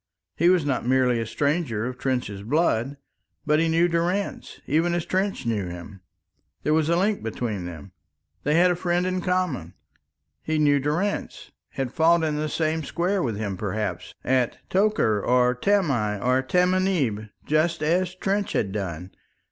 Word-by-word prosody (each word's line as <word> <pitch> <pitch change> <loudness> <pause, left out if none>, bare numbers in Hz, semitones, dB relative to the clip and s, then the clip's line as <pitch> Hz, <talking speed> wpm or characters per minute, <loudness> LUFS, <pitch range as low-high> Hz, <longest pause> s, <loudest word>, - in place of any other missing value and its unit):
He 170 - +4
was 180 -5 +3
not 140 -3 0
merely 125 -1 +2
a 115 - -3
stranger 140 -6 -1
of 125 0 -4
Trench's 125 -7 -2
blood, 135 +1 0 0.5
but 150 +1 +3
he 165 - +2
knew 165 +2 +3
Durrance 175 +4 -2
even 165 +4 +1
as 175 - -2
Trench 190 -7 -1
knew 105 -5 -1
him. 90 +2 -9 0.6
There 150 - +2
was 155 0 +2
a 170 - +3
link 200 +4 +1
between 110 -4 -3
them, 90 +2 -9 0.5
they 150 +2 +1
had 180 +2 +5
a - - +1
friend 175 0 0
in 185 0 -1
common. 180 - -1 0.7
He 155 0 -1
knew 145 -2 +4
Durrance, 160 +9 -2 0.2
had 135 -2 -3
fought 165 0 +4
in 155 -1 0
the 155 0 -2
same 160 +1 0
square 180 +6 -1
with 115 -8 -2
him, 100 -3 -3
perhaps, 95 -3 -4
at 130 -2 +1
Tokar, 185 - +2
or 125 0 +3
Tamai, 125 - +1
or 125 +4 +2
Tamanieb, 180 - +1 0.2
just 155 +2 +1
as 180 +3 +1
Trench 200 +2 -1
had 100 - 0
done! 95 -3 -5
150 Hz, 165 wpm, -24 LUFS, 115-175 Hz, 0.7 s, had